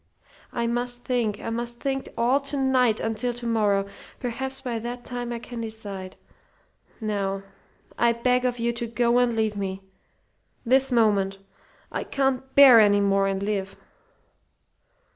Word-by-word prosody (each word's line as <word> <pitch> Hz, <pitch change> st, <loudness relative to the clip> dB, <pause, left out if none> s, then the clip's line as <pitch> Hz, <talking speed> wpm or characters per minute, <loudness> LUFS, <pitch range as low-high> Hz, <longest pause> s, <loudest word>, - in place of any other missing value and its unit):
I 235 Hz, -, -2 dB
must 245 Hz, +1 st, -2 dB
think. 235 Hz, -5 st, 0 dB
I -, -, -5 dB
must 235 Hz, +1 st, -4 dB
think 270 Hz, -1 st, -2 dB
all 245 Hz, +4 st, +3 dB
to 280 Hz, +1 st, -3 dB
night, 255 Hz, -4 st, +3 dB
until 230 Hz, +2 st, -1 dB
to 240 Hz, 0 st, -6 dB
morrow. 210 Hz, -4 st, +2 dB, 0.3 s
Perhaps 265 Hz, +2 st, -3 dB
by 240 Hz, -3 st, -3 dB
that 240 Hz, +2 st, -6 dB
time 245 Hz, -1 st, -5 dB
I 235 Hz, -, -3 dB
can 235 Hz, 0 st, -7 dB
decide. 205 Hz, -4 st, -7 dB, 0.8 s
Now 200 Hz, -3 st, -2 dB, 0.6 s
I 235 Hz, 0 st, +4 dB
beg 250 Hz, +2 st, +1 dB
of 250 Hz, -1 st, 0 dB
you 235 Hz, 0 st, 0 dB
to 235 Hz, 0 st, -4 dB
go 235 Hz, +1 st, +2 dB
and 245 Hz, -2 st, +2 dB
leave 220 Hz, -1 st, 0 dB
me 195 Hz, -1 st, -4 dB, 0.8 s
this 265 Hz, +2 st, +3 dB
moment. 205 Hz, -5 st, +2 dB, 0.5 s
I -, -, -3 dB
can't 265 Hz, -1 st, -1 dB
bear 270 Hz, -4 st, +9 dB
any 205 Hz, -1 st, +5 dB
more 195 Hz, -1 st, +2 dB
and 195 Hz, 0 st, -2 dB
live." 200 Hz, -2 st, -3 dB
235 Hz, 150 wpm, -25 LUFS, 210-250 Hz, 0.8 s, bear